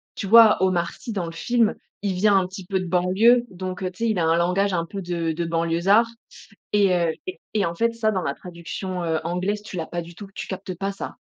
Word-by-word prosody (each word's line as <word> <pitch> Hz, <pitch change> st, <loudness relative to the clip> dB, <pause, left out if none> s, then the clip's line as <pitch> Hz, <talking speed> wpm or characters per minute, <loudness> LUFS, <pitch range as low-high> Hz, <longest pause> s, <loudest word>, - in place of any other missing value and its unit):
tu -, -, -4 dB
vois 225 Hz, +1 st, +8 dB
Omar 175 Hz, -2 st, +1 dB
Sy 235 Hz, -, -8 dB
dans 195 Hz, -5 st, -2 dB
le 165 Hz, -, -6 dB
film, 230 Hz, +6 st, +1 dB, 0.3 s
il 200 Hz, -2 st, -1 dB
vient 200 Hz, +2 st, +4 dB
un 185 Hz, -1 st, +1 dB
petit 190 Hz, 0 st, -9 dB
peu 190 Hz, +1 st, -1 dB
de 185 Hz, -, -4 dB
banlieue 190 Hz, +8 st, +4 dB
donc 185 Hz, 0 st, -6 dB
tu 230 Hz, +6 st, -4 dB
sais, -, -, +2 dB
il 215 Hz, -4 st, 0 dB
a 165 Hz, -, +2 dB
un 165 Hz, +1 st, +3 dB
langage 185 Hz, +3 st, +1 dB
un 170 Hz, -1 st, 0 dB
peu 195 Hz, +4 st, -6 dB
de 170 Hz, -2 st, -2 dB
de 170 Hz, +2 st, -2 dB
banlieusard 170 Hz, +7 st, +3 dB, 0.7 s
et 200 Hz, -3 st, +4 dB
heu 170 Hz, -2 st, +1 dB, 0.2 s
et 370 Hz, -, -6 dB, 0.2 s
et 205 Hz, -2 st, +2 dB
en 170 Hz, -, -2 dB
fait 230 Hz, +5 st, +1 dB
ça, 225 Hz, -2 st, +1 dB
dans 190 Hz, -3 st, -1 dB
la 140 Hz, -, -2 dB
traduction, 180 Hz, +1 st, -6 dB
heu, 160 Hz, -1 st, 0 dB
anglaise 185 Hz, +5 st, -2 dB
tu 200 Hz, -3 st, -8 dB
l'as 160 Hz, -, -3 dB
pas 175 Hz, -, -4 dB
du 170 Hz, +1 st, -11 dB
tout, 200 Hz, +2 st, -9 dB
tu -, -, -5 dB
captes 190 Hz, -1 st, -5 dB
pas 195 Hz, +3 st, -2 dB
ça. 195 Hz, -, -7 dB
185 Hz, 250 wpm, -23 LUFS, 170-205 Hz, 0.7 s, vois